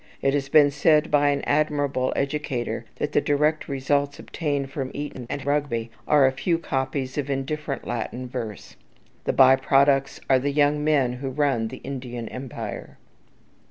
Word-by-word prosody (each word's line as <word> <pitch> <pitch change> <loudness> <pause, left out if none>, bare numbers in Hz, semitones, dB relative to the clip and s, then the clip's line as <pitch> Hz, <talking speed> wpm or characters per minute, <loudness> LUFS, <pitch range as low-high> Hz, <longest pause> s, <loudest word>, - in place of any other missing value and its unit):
It 135 - +3
has 140 -1 -1
been 145 -1 +6
said 150 +2 +3
by 145 -1 +4
an 140 -1 0
admirable 145 -3 +1
educator 135 -5 -2
that 150 - -3
the - - +3
direct 150 +2 +1
results 140 +1 0
obtained 145 -4 -3
from 135 -2 -3
Eton 140 -4 -6
and 140 -2 -4
Rugby 140 -6 -1 0.2
are 145 -2 +5
a 130 - +4
few 135 +6 0
copies 135 -2 -2
of 145 -1 -3
indifferent 140 +1 -3
Latin 120 +2 -4
verse; 120 -5 -7 0.5
the - - +2
by 130 0 +7
products 135 +1 +2
are 130 -1 +4
the 140 +2 -1
young 150 +1 +2
men 140 -5 +2
who 135 +2 -4
run 130 -4 0
the - - -8
Indian 125 -4 -5
Empire. 130 -1 -7
140 Hz, 160 wpm, -24 LUFS, 130-145 Hz, 0.5 s, by